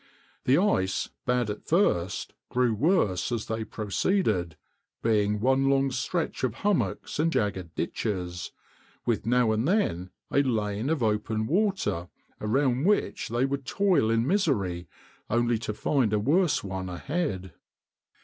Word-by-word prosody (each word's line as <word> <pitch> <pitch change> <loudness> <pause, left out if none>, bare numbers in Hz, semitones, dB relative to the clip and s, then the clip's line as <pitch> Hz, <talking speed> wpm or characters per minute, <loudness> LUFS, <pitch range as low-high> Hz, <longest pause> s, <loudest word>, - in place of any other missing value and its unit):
The 130 +3 +5
ice, 95 - +1 0.2
bad 125 -3 +1
at 105 - -7
first, 95 - +1 0.2
grew 125 -2 +2
worse 110 - +1
as 115 -3 -2
they 110 0 -3
proceeded, 105 - 0 0.5
being 105 -2 +2
one 135 +4 +3
long 135 0 +2
stretch 170 +3 -2
of 120 -3 0
hummocks 205 -6 0
and 165 +2 +2
jagged 95 - -2
ditches, 90 -4 -3 0.5
with 115 -1 0
now 120 -1 +3
and 110 +5 0
then 95 - +1 0.2
a 140 - +4
lane 110 -2 -1
of 160 -6 0
open 110 0 0
water 185 - 0 0.3
around 130 +4 +1
which 210 +2 +1
they 120 +3 +1
would 140 0 -2
toil 180 - +2
in 115 +1 +2
misery 105 - 0 0.4
only 120 0 +2
to 110 - -3
find 110 +2 +1
a 105 - +3
worse 160 - +2
one 95 -1 -4
ahead. 95 - -3
115 Hz, 140 wpm, -27 LUFS, 105-140 Hz, 0.5 s, The